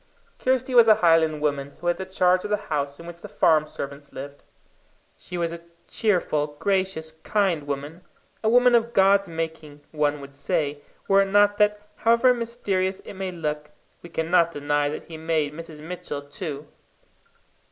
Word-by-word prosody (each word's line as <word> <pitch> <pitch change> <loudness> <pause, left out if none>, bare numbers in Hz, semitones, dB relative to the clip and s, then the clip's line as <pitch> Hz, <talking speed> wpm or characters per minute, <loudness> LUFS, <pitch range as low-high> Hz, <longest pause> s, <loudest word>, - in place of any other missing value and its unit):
Kirsty 260 0 0
was 235 -2 +7
a 215 - +8
Highland 165 -4 +3
woman 140 -2 -2
who - - -11
had 175 0 +1
the 190 - -6
charge 185 -1 +2
of 210 - -5
the 210 - +2 0.2
house 140 0 -2
in 170 - -10
which 170 0 -10
the - - -9
farm 155 -1 +3
servants 140 0 -8
lived. 140 +1 -9 0.7
She 180 - -8
was 170 -1 -1
a 170 - -8 0.3
cheerful, 155 -8 0
gracious, 190 -4 -1
kind 170 -1 -1
woman 145 +5 -5 0.4
a 220 - +3
woman 245 +1 +5
of 235 0 +2
God's 195 -1 +4
making, 160 -3 -6
one 150 -1 0
would 140 0 -11
say, 145 0 -2 0.3
were 195 0 +5
it - - +2
not 205 +1 +3
that, 210 0 +2
however 235 +3 +4
mysterious 205 -6 -2
it - - -10
may 190 -1 -4
look, 150 -3 -4 0.3
we 170 - -11
cannot 170 +1 +2
deny 145 -1 0
that 150 - -5
he 165 -1 -10
made 155 -2 -1
Mrs. 160 -1 -9
Mitchell 155 -4 -6
too. 145 0 -6
165 Hz, 175 wpm, -24 LUFS, 150-195 Hz, 0.7 s, a